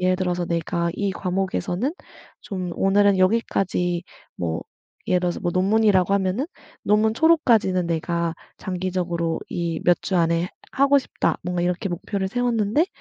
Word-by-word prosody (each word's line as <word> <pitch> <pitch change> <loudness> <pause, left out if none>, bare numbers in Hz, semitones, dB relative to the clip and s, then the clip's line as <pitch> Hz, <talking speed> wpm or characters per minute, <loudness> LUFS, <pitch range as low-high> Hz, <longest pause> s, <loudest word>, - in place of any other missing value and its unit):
예를 185 0 +2
들어서 180 -1 -1
내가 170 0 -1
이 200 -2 -1
과목에서는 190 - -2 0.5
좀 185 -3 -5
오늘은 200 0 +3
여기까지 185 -3 +1 0.3
뭐 80 -2 -2 0.4
예를 180 -1 +2
들어서 175 -1 -2
뭐 175 - -1
논문이라고 195 0 +3
하면은 200 +7 0 0.4
'논문 215 +1 +3
초록까지는 230 - +3
내가 170 0 -1 0.2
장기적으로 175 -3 -2
이 170 -2 -2
몇 175 0 +4
주 190 - -1
안에 170 +1 +2 0.2
하고 280 +1 +4
싶다.' - - -1
뭔가 175 0 -2
이렇게 180 +2 -1
목표를 190 +2 -3
세웠는데 240 - +1
185 Hz, 330 characters per minute, -23 LUFS, 175-205 Hz, 0.5 s, 몇